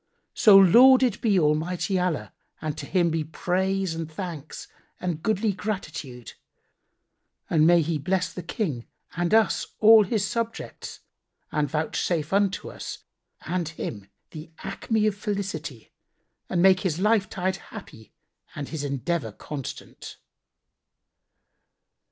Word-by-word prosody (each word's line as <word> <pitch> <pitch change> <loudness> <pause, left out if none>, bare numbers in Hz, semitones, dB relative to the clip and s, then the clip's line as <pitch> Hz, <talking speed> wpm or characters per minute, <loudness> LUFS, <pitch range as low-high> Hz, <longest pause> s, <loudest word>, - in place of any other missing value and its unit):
So 205 -3 +7
lauded 245 +4 +6
be 205 -5 +3
Almighty 170 +5 0
Allah 180 -4 -2 0.3
and 155 -1 -4
to 140 - -7
Him 175 -3 +2
be 160 -1 -1
praise 185 +3 -1
and 165 -1 -5
thanks 160 -4 -7 0.3
and 175 -4 -3
goodly 215 +1 0
gratitude! 160 - -6 1.2
And 155 -1 +4
may 170 -1 +5
He 160 0 -2
bless 180 +5 -1
the 180 - -6
King 160 - -3 0.3
and 175 +1 -1
us 220 -1 +3
all 220 0 +8
his 200 0 -1
subjects 230 0 -5 0.5
and 150 -2 0
vouchsafe 155 +2 -1
unto 200 -1 0
us - - -8 0.4
and 175 -2 -2
him 105 -10 -6 0.2
the 155 0 -9
acme 220 -2 -1
of 215 - +2
felicity 195 - -5 0.6
and 175 - +1
make 190 -1 +6
his 180 -5 -1
life 210 +1 +2
tide 185 0 -2
happy 180 - -12 0.4
and 145 - -5
his 155 -3 -4
endeavour 140 -2 -2
constant!" 140 +5 -8
180 Hz, 125 wpm, -25 LUFS, 155-200 Hz, 1.2 s, all